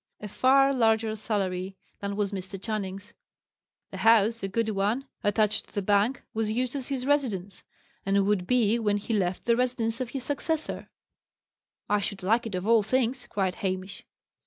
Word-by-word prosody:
A 210 - -6
far 270 +5 +4
larger 225 -3 +2
salary 195 -3 -2 0.2
than 200 0 -3
was 205 -1 -1
Mr. 195 0 -6
Channing's. 205 0 -5 0.8
The - - -6
house, 225 0 +4
a 195 - -2
good 220 +3 -1
one, 215 +6 0 0.2
attached 210 0 +1
to - - -23
the 205 - -1
bank, 205 +6 +2
was 220 -1 -1
used 250 +3 -1
as 270 -3 -3
his 265 -3 -3
residence, 210 -10 -1 0.4
and 195 0 +2
would 200 -3 +1
be, 235 -2 +3
when 205 -2 +1
he 210 +3 -4
left, 185 -3 -1
the 235 - +4
residence 240 -2 0
of 250 - -3
his 265 0 -5
successor. 305 +3 -3 1.0
"I 210 - +2
should 200 -1 -4
like 225 +5 +2
it 205 - -4
of 180 +1 -3
all 230 0 +5
things!" 250 +3 0
cried 190 -3 0
Hamish. 190 0 -3
215 Hz, 175 wpm, -27 LUFS, 200-240 Hz, 1.0 s, all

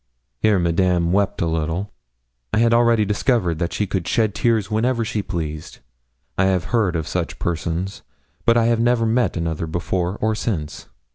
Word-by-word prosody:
Here 110 -2 +3
Madame 85 0 +1
wept 100 -1 +1
a - - +1
little. 80 +4 -2 0.6
I - - +1
had 115 +1 +4
already 115 -2 +4
discovered 100 - +1
that 85 -1 -1
she 105 - -1
could 95 -4 -3
shed 110 +2 +1
tears 110 -1 +1
whenever 115 +2 +1
she 110 -1 -2
pleased. 80 -5 -5 0.6
I 95 - +4
have 95 -2 +2
heard 105 -7 +2
of 80 -2 -2
such - - -3
persons, 85 +3 -3 0.4
but 115 0 +4
I 115 0 +3
never 115 0 +2
met 115 -3 +1
another 80 -1 -2
before 85 +3 -2
or 110 +1 +1
since. 90 -9 -4
95 Hz, 165 wpm, -21 LUFS, 85-115 Hz, 0.6 s, had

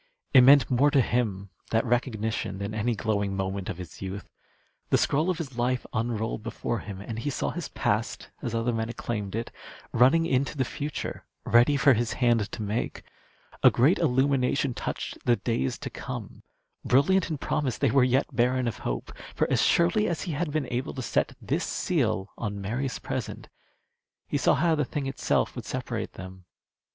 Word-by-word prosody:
It 130 - +9
meant 135 0 +7
more 130 +4 +4
to 145 -1 +3
him, 105 -7 0 0.2
that 115 +2 +1
recognition, 110 -4 -1
than 100 +2 -4
any 110 +2 0
glowing 100 -3 -1
moment 95 0 -3
of 85 - -4
his 90 -3 -9
youth. 95 +1 -5 0.6
The - - +4
scroll 155 +6 +1
of 180 - 0
his 135 -7 -6
life 125 +1 0
unrolled 110 -1 -1
before 115 +1 -3
him, 100 -2 -8
and 115 +2 -5
he 145 - -2
saw 140 - -2
his 175 -4 -5
past, 110 +3 -2
as 120 -4 -3
other 115 +1 0
men 110 0 -2
acclaimed 105 -4 -4
it, 115 +1 -3 0.4
running 145 +7 +5
into 140 +1 0
the 130 - +1
future 145 +2 -5 0.2
ready 120 +5 +5
for 140 +1 +6
his 120 0 0
hand 120 -4 +2
to 110 - -5
make. 105 +3 -3 0.6
A - - +8
great 140 +10 +3
illumination 135 -2 +2
touched - - -4
the 120 - +5
days 115 - -1
to - - -6
come. - - -7 0.4
Brilliant 175 +10 +3
in 155 - -2
promise, 130 -3 -1
they 140 -5 +2
were 135 -1 +5
yet 130 +1 +1
barren 125 +1 +2
of 115 - -3
hope. - - -4 0.2
For - - +1
as - - +3
surely 175 +5 +3
as 170 -2 -2
he 180 - -3
had 160 +2 -1
been 155 -2 0
able 125 +2 -2
to 130 - -4
set - - 0
this - - -1
seal 95 +1 0
on 100 -3 -3
Mary's 125 +7 -2
present, - - -5 0.8
he - - -1
saw - - +4
how 165 0 +2
the 150 -1 +1
thing 140 +1 -3
itself 135 0 0
would - - -6
separate - - -4
them. 95 -1 -10
120 Hz, 185 wpm, -27 LUFS, 110-140 Hz, 0.8 s, It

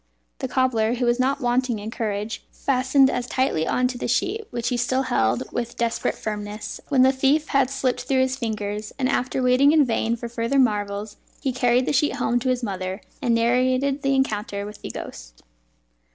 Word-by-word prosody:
The - - -2
cobbler 240 -3 +1
(who 245 0 -1
was 240 +1 +2
not 275 +3 +1
wanting 245 -1 +1
in 210 +2 -6
courage) 210 -1 -3
fastened 265 +1 +3
as 250 -2 -2
tightly 255 - 0
on 250 0 +2
to 250 -1 -6
the - - -2
sheet, 415 - -1
which 240 -1 -2
he 250 - 0
still 255 +2 +1
held 115 - +1
with 240 0 -4
desperate 235 -1 -1
firmness 210 0 -5
when 265 -3 +4
the 260 - +6
thief 275 +3 +1
had 275 -2 +3
slipped 265 -2 -1
through 260 0 +2
his 260 0 +1
fingers; 210 -4 -4
and 260 -2 +1
after 255 0 0
waiting 255 +4 +5
in 305 -3 +5
vain 230 -1 0
for 235 0 -6
further 235 +3 -1
marvels, 205 -4 0 0.2
he 270 -3 -2
carried 245 0 +2
the - - 0
sheet 295 +2 +2
home 240 +2 +1
to 255 +2 -1
his 250 -1 0
mother, 190 -2 -4 0.2
and 240 -4 +2
narrated 255 +4 +2
his - - -9
encounter 215 -7 0
with 210 0 -10
the - - -6
ghost. - - -9
245 Hz, 195 wpm, -23 LUFS, 220-265 Hz, 0.2 s, the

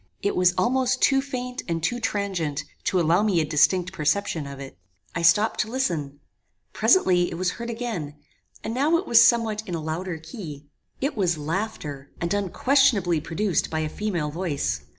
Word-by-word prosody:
It 200 - 0
was 180 0 +3
almost 255 +6 +1
too 270 -1 +4
faint 250 -2 -5
and 165 -2 -2
too 240 +8 0
transient 195 -10 -2 0.2
to 185 - +2
allow 170 +3 +3
me 205 -5 +2
a 155 - +1
distinct 180 +5 +2
perception 155 -1 -1
of 140 -1 -8
it. 135 -1 -9 0.4
I 170 - -2
stopped 195 +7 +3
to 215 - 0
listen; 165 - -2 0.5
presently 180 - +3
it - - -6
was 180 +1 0
heard 235 0 -6
again, 225 -11 -4 0.5
and 225 - -3
now 295 +7 +3
it 370 - -4
was 235 -5 +7
somewhat 225 -2 +3
in 175 - -3
a - - -3
louder 160 +3 -4
key. 160 - -9 0.4
It 280 +3 -1
was 180 -6 +1
laughter; 150 -4 -4
and 170 +2 -1
unquestionably 205 - +2
produced 185 +5 -1
by 160 0 -2
a 155 - -2
female 175 -6 -2
voice. 145 - -2
185 Hz, 175 wpm, -24 LUFS, 160-225 Hz, 0.5 s, was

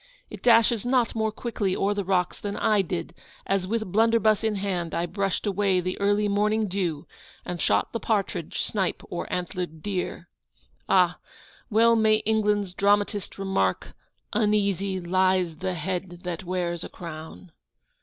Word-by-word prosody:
It - - -8
dashes 230 -2 +4
not 245 -1 +2
more 220 -1 0
quickly 210 -5 -2
o'er 200 +1 +1
the 205 -1 -2
rocks 180 -1 0
than 205 -1 -4
I 215 -2 +3
did, 175 -3 -4 0.3
as, 195 -2 0
with 220 -2 -2
blunderbuss 220 0 +3
in 220 -1 +1
hand, 185 -4 -2
I 170 - 0
brushed 195 +3 -2
away 195 -2 +2
the 185 +1 -3
early 205 +1 +2
morning 210 +2 +1
dew, 180 -6 -2 0.4
and 175 -1 -4
shot - - +1
the 230 - -1
partridge, 200 -8 -1
snipe, 195 -4 -2
or 175 - -4
antlered 175 -3 -4
deer! 185 -3 -3 0.6
Ah! - - +4 0.5
well 230 +1 +5
may 220 -1 +4
England's 210 -3 +1
dramatist 205 +1 +1
remark, 190 - -1 0.4
"Uneasy 200 -3 +1
lies 185 -1 +1
the 185 +2 -2
head 175 +1 -4
that 180 +1 -4
wears 175 -1 -2
a - - -7
crown!" 165 +1 -9
195 Hz, 150 wpm, -26 LUFS, 180-210 Hz, 0.6 s, well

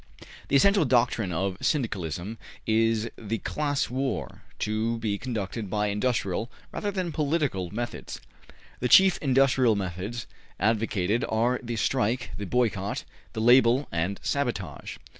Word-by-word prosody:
The - - +1
essential 200 +6 +5
doctrine 120 -6 +2
of 95 +2 -1
Syndicalism 100 - -2 0.3
is 115 0 +2
the 110 +1 -2
class 145 +4 -1
war, 135 +1 -3 0.2
to 110 +2 -1
be 105 -3 -2
conducted 110 -4 -4
by 105 +1 0
industrial 110 0 -1 0.2
rather 205 - -2
than 185 -4 -2
politi 150 0 +1
cal 90 -2 -4
methods. 120 +4 -5 0.6
The 125 - 0
chief 190 +3 +7
industrial 130 -4 +3
methods 100 +4 -4 0.3
advocated 110 0 +1
are 120 +3 +1
the 120 -1 -4
strike, 120 +2 0
the 100 - -5
boycott, 105 -4 0 0.3
the 110 - -3
label 120 +3 +5
and 85 +4 -1
sabotage. 115 - -3
115 Hz, 130 wpm, -27 LUFS, 100-130 Hz, 0.6 s, chief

